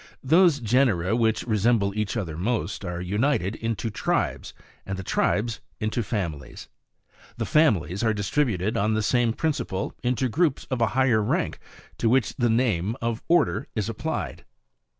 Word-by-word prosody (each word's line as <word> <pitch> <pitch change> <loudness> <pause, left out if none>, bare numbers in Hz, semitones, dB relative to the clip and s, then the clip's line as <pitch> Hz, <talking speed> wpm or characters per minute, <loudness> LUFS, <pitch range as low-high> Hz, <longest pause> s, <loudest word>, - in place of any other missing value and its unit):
5. - - -22
Those 170 -3 +6
genera 110 -5 +2
which 110 -2 +1
resemble 110 -2 +1
each 105 +1 -2
other 85 -8 -3
most, 100 +1 -2
are 90 -2 -4
united 105 +1 0
into 115 0 -3
TRIBES, - - -1 0.3
and 95 -1 -5
the 95 - -5
tribes 110 +4 0 0.2
into 110 +2 -1
FAMILIES. 85 - -4
6. - - -13 0.7
The - - -2
families 100 - +2
are 110 - +3
distributed 105 -1 0
on 110 +2 +1
the 110 - 0
same 120 +1 +2
principle, 140 - -2
into 125 +1 0
groups, 150 +3 0
of 130 -2 -1
a 115 - +4
higher 125 -5 +4
rank 105 - -1 0.4
to 115 - +2
which 125 -1 +2
the 120 -2 +1
name 110 -4 +1
of 115 0 -2
ORDER 155 -8 +2
is 110 -1 -1
applied. 115 - -4
110 Hz, 160 wpm, -25 LUFS, 100-125 Hz, 0.7 s, Those